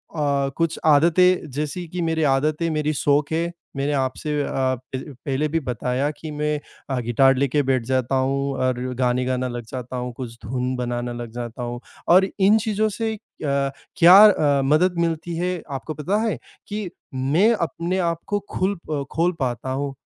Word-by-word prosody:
अ, 140 Hz, -3 st, +1 dB
कुछ 165 Hz, -1 st, 0 dB
आदतें 170 Hz, +4 st, +4 dB
जैसी 150 Hz, +5 st, -4 dB
कि 180 Hz, +2 st, -4 dB
मेरे 160 Hz, -1 st, 0 dB
आदतें 150 Hz, +4 st, +1 dB
मेरी 155 Hz, 0 st, 0 dB
शौक 145 Hz, +1 st, +1 dB
हैं, 165 Hz, +2 st, 0 dB, 0.2 s
मैंने 140 Hz, +2 st, -1 dB
आपसे 145 Hz, +2 st, -1 dB
अ, -, -, -3 dB
प 130 Hz, -1 st, 0 dB, 0.5 s
पहले 140 Hz, +2 st, +1 dB
भी 165 Hz, +2 st, 0 dB
बताया 125 Hz, +1 st, -1 dB
कि 155 Hz, +1 st, -8 dB
मैं 150 Hz, 0 st, -1 dB, 0.3 s
अ, 135 Hz, -2 st, 0 dB
गिटार 125 Hz, +3 st, +3 dB
लेके 140 Hz, +2 st, +1 dB
बैठ 130 Hz, -2 st, +1 dB
जाता 130 Hz, +1 st, 0 dB
हूँ 135 Hz, +1 st, 0 dB
और 130 Hz, -1 st, 0 dB, 0.2 s
गाने 125 Hz, 0 st, +1 dB
गाना 130 Hz, 0 st, -1 dB
लग 120 Hz, -1 st, -5 dB
जाता 125 Hz, 0 st, -5 dB
हूँ। 125 Hz, 0 st, -4 dB
कुछ 120 Hz, -3 st, -7 dB
धुन 125 Hz, +2 st, -2 dB
बनाना 120 Hz, -1 st, -3 dB
लग 120 Hz, -1 st, -6 dB
जाता 120 Hz, 0 st, -6 dB
हूँ 120 Hz, 0 st, -4 dB, 0.3 s
और 185 Hz, +2 st, +6 dB
इन 200 Hz, +3 st, +6 dB
चीज़ों 215 Hz, 0 st, 0 dB
से 220 Hz, +1 st, -2 dB
अ, -, -, -14 dB, 0.8 s
क्या 175 Hz, +3 st, +9 dB
अ, 145 Hz, -8 st, +3 dB
मदद 170 Hz, +6 st, +3 dB
मिलती 165 Hz, 0 st, -1 dB
है 180 Hz, 0 st, -1 dB
आपको 140 Hz, +3 st, -4 dB
पता 155 Hz, +7 st, -1 dB
है, 225 Hz, -, 0 dB, 0.3 s
कि 210 Hz, -2 st, -4 dB, 0.3 s
मैं 150 Hz, -, +3 dB
अपने 170 Hz, -2 st, -2 dB
आप 170 Hz, -2 st, 0 dB
को 205 Hz, -, 0 dB
खुल 195 Hz, +2 st, 0 dB
प 145 Hz, -3 st, -2 dB
खोल 170 Hz, +2 st, +2 dB
पाता 130 Hz, -1 st, -2 dB
हूँ। 140 Hz, +1 st, -2 dB
145 Hz, 180 wpm, -23 LUFS, 130-170 Hz, 0.8 s, क्या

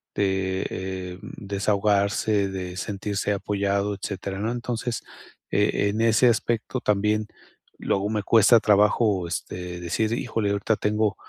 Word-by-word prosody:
de, 95 Hz, -1 st, 0 dB
eh, 95 Hz, -1 st, -5 dB
desahogarse, 100 Hz, 0 st, 0 dB
de 90 Hz, -2 st, -5 dB
sentirse 100 Hz, +1 st, -2 dB
apoyado, 100 Hz, 0 st, -1 dB
etcétera, 95 Hz, 0 st, -5 dB
¿no? 110 Hz, +3 st, -1 dB
Entonces, 120 Hz, -1 st, -3 dB, 0.5 s
eh, 100 Hz, 0 st, +2 dB
en 110 Hz, +2 st, -1 dB
ese 115 Hz, +2 st, +4 dB
aspecto, 115 Hz, +2 st, -1 dB
también 105 Hz, +1 st, +1 dB, 0.5 s
luego 100 Hz, +1 st, 0 dB
me 105 Hz, -2 st, -1 dB
cuesta 115 Hz, +2 st, +6 dB
trabajo, 105 Hz, -2 st, +3 dB
este, 90 Hz, +1 st, -5 dB
decir: 110 Hz, +6 st, -1 dB
"Híjole, 115 Hz, -3 st, -1 dB
ahorita 100 Hz, +2 st, +1 dB
tengo 105 Hz, 0 st, +1 dB
100 Hz, 120 wpm, -25 LUFS, 95-110 Hz, 0.5 s, cuesta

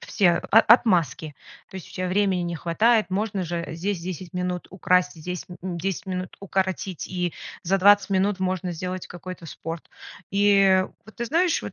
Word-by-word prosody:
все 190 Hz, -5 st, +2 dB, 0.2 s
о 220 Hz, -, +8 dB
отмазки, 170 Hz, -, +3 dB, 0.4 s
то -, -, -18 dB
есть 185 Hz, -, -9 dB
у -, -, -15 dB
тя 185 Hz, 0 st, -3 dB
времени 190 Hz, -1 st, +1 dB
не 170 Hz, 0 st, -3 dB
хватает. 215 Hz, +8 st, +2 dB
Можно 200 Hz, 0 st, -1 dB
же 170 Hz, 0 st, -3 dB
здесь 190 Hz, +2 st, -2 dB
10 180 Hz, 0 st, -6 dB
минут 180 Hz, 0 st, -2 dB
украсть, 180 Hz, -1 st, +2 dB
здесь, 175 Hz, +2 st, -6 dB, 0.2 s
м, 180 Hz, -2 st, -4 dB
10 190 Hz, +1 st, -3 dB
минут 185 Hz, -1 st, -4 dB
укоротить, 190 Hz, -2 st, -2 dB
и 180 Hz, -2 st, -2 dB, 0.3 s
за 195 Hz, +3 st, +1 dB
20 205 Hz, +1 st, +5 dB
минут 195 Hz, +1 st, +1 dB
можно 185 Hz, -1 st, -1 dB
сделать 180 Hz, +2 st, -5 dB
какой-то 180 Hz, -1 st, -9 dB
спорт. 165 Hz, +2 st, -7 dB, 0.4 s
И 195 Hz, -2 st, +4 dB, 0.2 s
вот 220 Hz, -, -16 dB
ты 235 Hz, -, -2 dB
знаешь 335 Hz, +7 st, +1 dB
вот, -, -, -6 dB
185 Hz, 175 wpm, -24 LUFS, 175-200 Hz, 0.4 s, о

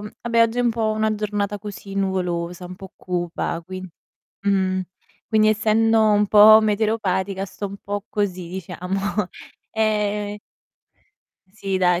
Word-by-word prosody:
vabbè, 230 Hz, +2 st, 0 dB
oggi 230 Hz, +1 st, +1 dB
è -, -, +3 dB
un 240 Hz, -, +3 dB
po' 225 Hz, -1 st, 0 dB
una 215 Hz, 0 st, 0 dB
giornata 205 Hz, -1 st, -2 dB
così 200 Hz, -1 st, -8 dB
nuvolosa, 180 Hz, -2 st, -2 dB
un 180 Hz, +1 st, -8 dB
po' 190 Hz, 0 st, -11 dB
cupa 175 Hz, -2 st, -3 dB
quin 185 Hz, +1 st, -7 dB, 0.5 s
mh, 190 Hz, -2 st, +1 dB, 0.5 s
quindi 215 Hz, -1 st, +4 dB
essendo 220 Hz, 0 st, +3 dB
un 205 Hz, 0 st, +3 dB
po' 215 Hz, +1 st, +9 dB
meteoropatica 205 Hz, -3 st, 0 dB
sto 200 Hz, +1 st, -6 dB
un 200 Hz, 0 st, -8 dB
po' 205 Hz, 0 st, -5 dB
così 185 Hz, -4 st, -2 dB
diciamo. 180 Hz, +1 st, -4 dB, 0.7 s
Ehm 210 Hz, -1 st, 0 dB, 1.1 s
sì, 195 Hz, -1 st, -3 dB
dai, 180 Hz, -1 st, +3 dB
205 Hz, 135 wpm, -22 LUFS, 185-215 Hz, 1.1 s, po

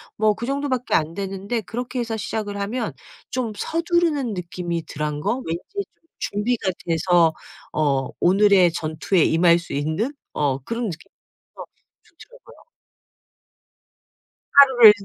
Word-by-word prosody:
뭐 215 Hz, 0 st, +3 dB
그 230 Hz, +3 st, -6 dB
정도밖에 275 Hz, -3 st, -1 dB
안 160 Hz, 0 st, +1 dB
되는데 195 Hz, +4 st, -3 dB
그렇게 245 Hz, +5 st, -5 dB
해서 230 Hz, -2 st, -2 dB
시작을 205 Hz, -1 st, -4 dB
하면 215 Hz, -, -2 dB, 0.4 s
좀 250 Hz, -3 st, -2 dB
서두르는 330 Hz, -, 0 dB
느낌이 175 Hz, -2 st, -4 dB
덜한 150 Hz, 0 st, -3 dB
거? 205 Hz, +9 st, 0 dB
왠지 165 Hz, +2 st, -3 dB
좀 400 Hz, -, -1 dB, 0.3 s
준비가 205 Hz, -1 st, -1 dB, 0.2 s
돼서 165 Hz, 0 st, +3 dB, 0.4 s
어 140 Hz, -4 st, 0 dB
오늘의 190 Hz, -1 st, +5 dB
전투에 160 Hz, +2 st, 0 dB
임할 170 Hz, +1 st, +4 dB
수 170 Hz, -, -9 dB
있는 160 Hz, -, -1 dB, 0.2 s
어 140 Hz, -3 st, 0 dB
그런 230 Hz, -, -3 dB
느낌이 165 Hz, -6 st, -7 dB, 0.4 s
들어서 -, -, -9 dB, 0.5 s
좋더라고요. -, -, -17 dB, 1.9 s
하루를 260 Hz, -6 st, +9 dB
200 Hz, 270 characters per minute, -22 LUFS, 165-245 Hz, 1.9 s, 하루를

